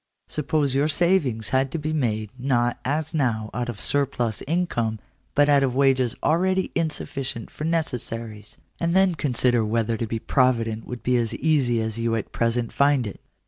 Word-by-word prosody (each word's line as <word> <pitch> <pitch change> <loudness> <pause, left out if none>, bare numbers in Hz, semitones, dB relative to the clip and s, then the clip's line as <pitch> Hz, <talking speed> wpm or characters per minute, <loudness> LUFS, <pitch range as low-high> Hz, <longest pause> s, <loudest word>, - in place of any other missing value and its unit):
Suppose 150 -2 0
your 140 +2 +2
savings 155 - +1
had 135 +1 +2
to - - 0
be 155 0 -2
made, 110 -8 -1
not, 120 -2 +1
as 150 +5 -1
now, 115 -8 0
out 120 +2 -2
of 110 -4 -6
surplus 125 -6 0
income, 130 -10 0 0.4
but 145 0 +5
out 145 -1 +5
of 130 -2 0
wages 130 -3 +3
already 185 +3 +2
insufficient 135 -7 -3
for 150 - -5
necessaries; 115 -9 -3 0.2
and 170 +1 0
then 190 -1 +4
consider 125 -5 +1
whether 115 +1 0
to 115 - -2
be 115 - -2
provident 115 -2 +1
would 125 -1 -7
be 125 0 +2
as 115 -2 -1
easy 135 -7 +2
as 110 +1 -4
you 115 0 0
at 110 - -4
present 115 0 -1
find 140 -3 +3
it. 100 - -7
125 Hz, 175 wpm, -24 LUFS, 115-150 Hz, 0.4 s, but